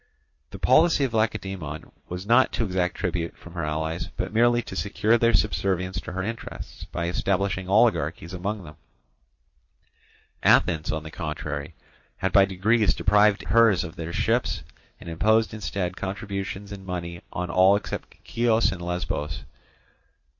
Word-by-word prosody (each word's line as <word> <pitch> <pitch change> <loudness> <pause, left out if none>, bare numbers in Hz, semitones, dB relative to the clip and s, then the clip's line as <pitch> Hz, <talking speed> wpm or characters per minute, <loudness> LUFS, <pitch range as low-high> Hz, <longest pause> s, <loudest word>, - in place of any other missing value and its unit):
The - - -9
policy 160 -3 +4
of 130 -4 -1
Lacedaemon 95 -8 -2 0.2
was 90 +2 -5
not 120 +4 +4
to - - 0
exact 90 -2 -1
tribute 85 -2 -3
from 85 - -13
her 85 -2 -3
allies, 80 +3 -2
but - - -3
merely 120 +1 +4
to - - -8
secure 100 +5 +1
their 115 0 +3
subservience 95 -3 0
to - - -8
her 95 +1 -2
interests 115 +3 -7
by 85 - -4
establishing 95 +1 -1
oligarchies 85 -6 +2
among 100 +3 -3
them; 75 -2 -12 1.6
Athens, 80 -3 +3
on 80 -1 -3
the 80 - -9
contrary, 75 -2 -5 0.4
had 95 - -1
by 100 -2 +7
degrees 105 +4 +2
deprived 105 -1 +3
hers 115 -5 +5
of 85 -1 -8
their 85 -1 -5
ships, - - 0 0.4
and - - -12
imposed 110 +7 +2
instead 90 -3 -3
contributions 100 0 -5
in 100 -1 -8
money 85 -2 -5
on 90 -1 -3
all 95 +3 +6
except 100 - -5
Chios 115 -1 +2
and 95 -2 -6
Lesbos. 85 -4 -3
95 Hz, 145 wpm, -25 LUFS, 85-105 Hz, 1.6 s, by